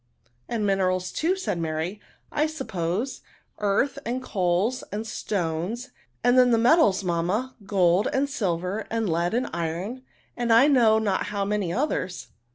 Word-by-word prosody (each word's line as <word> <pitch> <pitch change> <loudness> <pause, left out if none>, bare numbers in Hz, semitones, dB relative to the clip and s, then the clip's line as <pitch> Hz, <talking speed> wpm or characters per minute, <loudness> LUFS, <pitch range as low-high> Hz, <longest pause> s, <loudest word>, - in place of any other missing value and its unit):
" 120 +1 -40
And 225 -3 -1
minerals, 185 -2 +1
too," 345 +4 +1
said 375 - -3
Mary, 165 +5 -3
'* - - -38
I 310 - +4
sup 310 -4 -7
pose; 185 +9 -2 0.4
earth, 210 +7 +1
and 250 +2 -3
coals, 195 +3 0
and 215 +2 -3
stones; 205 +4 -3 0.3
ajid 245 +1 +5
then 250 -1 +6
the 235 - +4
metals, 225 - +4
mamma, 180 +9 -1
gold 185 -1 +3
and 275 +1 +1
silver, 195 - -2
and 225 -1 -1
lead 170 +4 0
and 250 +2 0
iron, 175 +10 -3 0.3
and 240 -1 -1
I 230 +5 +7
know 235 -6 +5
not 210 -3 0
how 200 -1 -2
many 200 -4 -1
others." 185 - -2
205 Hz, 165 wpm, -25 LUFS, 180-245 Hz, 0.4 s, I